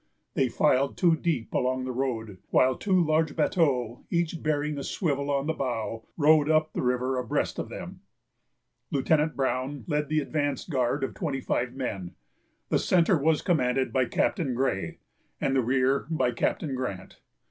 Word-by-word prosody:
They 130 -2 +1
filed 135 +4 +2
two 170 -3 +4
deep 155 -8 -2
along 130 0 0
the 130 - -3
road, 115 -6 -3
while 130 0 +4
two 190 -3 +1
large 155 0 +1
bateaux, 125 -9 +1
each 170 -1 -1
bearing 150 -1 -1
a - - -5
swivel 140 -5 -1
on 140 -1 0
the 160 - 0
bow, 115 -5 -3
rowed 155 -1 +5
up 155 0 +2
the - - -2
river 125 +1 0
abreast 125 - -1
of - - -4
them. - - -8 0.9
Lieutenant 150 +3 +1
Brown 135 +1 -1
led 150 -2 -1
the 155 0 +2
advance 145 -2 -2
guard 135 -2 0
of 135 - -2
twenty 145 -7 -3
five 125 -1 -2
men; 100 -9 -4 0.5
the - - +2
centre 175 -1 +3
was 155 +2 +2
commanded 130 -6 +1
by 130 -1 +3
Captain 140 - 0
Gray, 125 -7 -1 0.4
and 135 - 0
the 130 - +4
rear 130 +3 +1
by 130 -7 +1
Captain 135 +4 -1
Grant. 110 -8 -5
135 Hz, 165 wpm, -27 LUFS, 125-155 Hz, 0.9 s, rowed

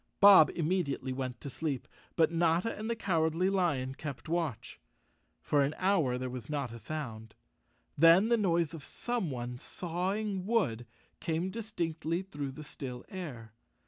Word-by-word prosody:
Bob 195 -6 +9
immediately 155 -6 -1
went 130 -2 -4
to - - -8
sleep, 140 -1 -3 0.3
but 160 -1 +4
Notta 170 +5 +2
and 215 +2 -5
the 235 - 0
Cow¬ 185 -7 +1
ardly 180 +4 +1
Lion 145 -9 +1
kept 135 -4 -7
watch. 160 -8 -2 0.6
For 145 - +3
an 140 +2 +1
hour 175 -10 +2
there 130 0 -3
was 125 -1 -6
not 140 -5 -2
a 115 - -8
sound. 110 -4 -6 0.6
Then 165 +8 +6
the 235 - +5
noise 170 -7 +1
of 160 -4 -8
someone 130 - -3
sawing 190 +4 -2
wood 120 - +1 0.3
came 170 +2 -1
distinctly 175 -6 -2
through 145 -7 -5
the 155 - -8
still 125 -4 -7
air. 125 - -7
160 Hz, 150 wpm, -31 LUFS, 130-185 Hz, 0.6 s, Bob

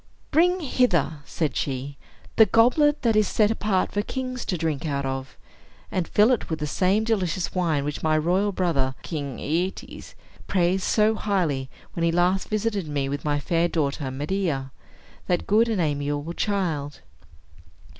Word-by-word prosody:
"Bring 360 +3 +3
hither," 180 - +1
said 155 -5 -2
she, 135 +1 -3 0.4
"the 220 - +7
goblet 295 +6 +3
that 230 -3 +3
is 215 -2 +4
set 215 -1 +2
apart 210 -4 0
for 205 - 0
kings 255 +2 -4
to 180 - -1
drink 160 -1 -2
out 140 -2 -1
of. 135 0 -5 0.5
And 180 -3 -1
fill 210 +4 +4
it 245 - 0
with 160 - -1
the 150 - -3
same 190 +8 +1
delicious 185 -6 -1
wine 165 -6 +1
which 150 0 -4
my 155 0 +2
royal 185 +6 +1
brother, 150 -9 0
King 140 -6 -4
Aetes, 190 - -3 0.3
praised 185 0 +1
so 215 0 +3
highly, 170 -12 -1 0.2
when 170 - -2
he 170 - +3
last 180 +3 +1
visited 215 -4 -1
me 140 -2 -2
with 145 +1 -4
my 145 -1 0
fair 165 +4 +1
daughter 145 -4 -1
Medea. 145 -1 -2 0.6
That 175 -2 0
good 225 +3 +3
and 220 -4 0
amiable 145 0 -1
child! 170 -9 -2
175 Hz, 160 wpm, -24 LUFS, 145-210 Hz, 0.6 s, the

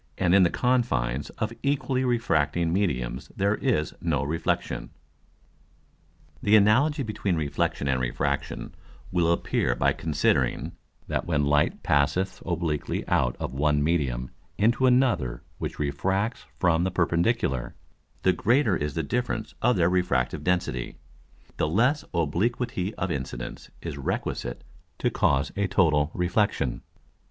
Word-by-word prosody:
And 90 -2 +2
in 100 - +7
the 90 - +5
Confines 75 - 0
of 110 +1 -2
equally 135 -2 0
refracting 85 - +1
Mediums 65 -9 -1
there 100 +1 +2
is 110 - 0
no - - 0
Reflexion._ 80 +3 -2 1.5
The 105 +1 +4
Analogy 135 +8 +4
between 105 -5 -1
Reflexion 70 -2 -1
and 65 -2 +1
Refraction 70 +3 -2 0.4
will 85 -2 +2
appear 85 - 0
by - - +2
considering, 75 -3 0 0.4
that - - -2
when 75 -4 +1
Light 75 +1 +1
passeth 75 +7 +1
obliquely 85 -4 -2
out - - +2
of - - -4
one 75 +1 +2
Medium 65 -7 0 0.3
into 120 +5 +3
another 120 - +2 0.2
which - - -4
refracts 95 - -1
from 85 -1 +3
the 95 - +1
perpendicular, 85 - 0 0.5
the 95 - +4
greater 115 +2 +2
is 75 -2 -3
the 80 - 0
difference 115 +4 -2
of 125 0 +3
their 85 -3 +3
refractive 90 -8 0
Density, 90 -9 -1 0.6
the - - +1
less 125 - +2
Obliquity 95 - -1
of 90 -1 -2
Incidence 65 -3 -5
is 75 -4 -5
requisite 60 -2 -3 0.3
to - - 0
cause 70 +1 +1
a 100 0 0
total 75 -5 +3
Reflexion. 90 - 0
85 Hz, 130 wpm, -26 LUFS, 70-105 Hz, 1.5 s, in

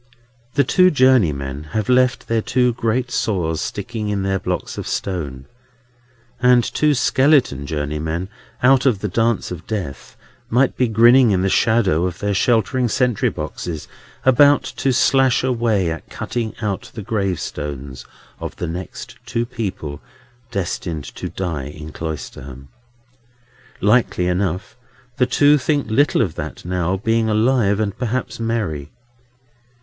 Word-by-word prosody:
The 140 - +4
two 185 +7 +4
journeymen 80 - +2
have 110 -1 -1
left 125 0 +2
their 115 -1 +1
two 125 +1 +1
great 120 +2 -1
saws 85 -8 -1
sticking 105 +1 -4
in 100 -2 -1
their 95 0 0
blocks - - -3
of - - -5
stone; 70 -9 -4 1.0
and 125 -1 +5
two 150 +5 +1
skeleton 130 - +2
journeymen 80 +4 -3 0.4
out 135 +1 +5
of 110 -7 +1
the 105 - -1
Dance 115 +2 0
of 85 -2 -7
Death 95 -11 -5 0.3
might 125 +3 +2
be 125 - +2
grinning 120 +3 +6
in 95 -2 +2
the 95 - +2
shadow 95 -7 +2
of 90 -1 -6
their 100 +1 -1
sheltering 120 +4 +2
sentry 125 -2 +1
boxes, 80 -4 -6 0.4
about 140 +3 +5
to 135 - +1
slash 130 0 +3
away 115 -8 +1
at 80 - -7
cutting 115 -2 -4
out 100 -3 -3
the 110 - -6
gravestones 75 - -3 0.4
of - - -6
the - - -4
next 85 +1 -7
two 115 0 -1
people 95 - -5 0.5
destined 85 -4 -3
to - - -6
die 85 -8 -4
in 75 +1 -9
Cloisterham. 70 -4 -7 1.1
Likely 105 -3 +2
enough, 90 0 -1 0.4
the 125 - +3
two 145 +3 +4
think 145 -4 -1
little 140 0 +3
of 90 -7 -3
that - - -7
now, 90 +1 -1
being 115 +2 +1
alive, 110 -2 +2
and 105 -2 -1
perhaps 120 -1 -2
merry. 105 -11 -2
105 Hz, 140 wpm, -20 LUFS, 85-125 Hz, 1.1 s, grinning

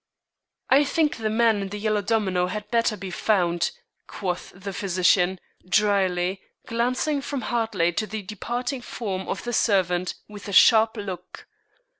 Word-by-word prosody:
"I 275 +3 +7
think 300 -1 +1
the 220 -1 -1
man 220 -1 +3
in 195 - -4
the 205 - -5
yellow 210 0 0
domino 195 -4 +1
had 210 +3 -6
better 230 -2 +2
be 195 -2 -7
found," 175 -3 +1 0.4
quoth 180 -3 -4
the 195 +1 -7
physician, 185 -1 +2 0.3
dryly, 190 -2 +2 0.2
glancing 255 +5 0
from 275 -1 -4
Hartley 220 -8 0
to 215 +5 -2
the 215 0 -5
departing 245 +6 -4
form 195 -6 -5
of - - -3
the 240 - -4
servant, 185 -5 +1
with 210 -1 -10
a 200 - -5
sharp 220 +3 +6
look. 185 -3 -7
205 Hz, 150 wpm, -24 LUFS, 185-230 Hz, 0.4 s, I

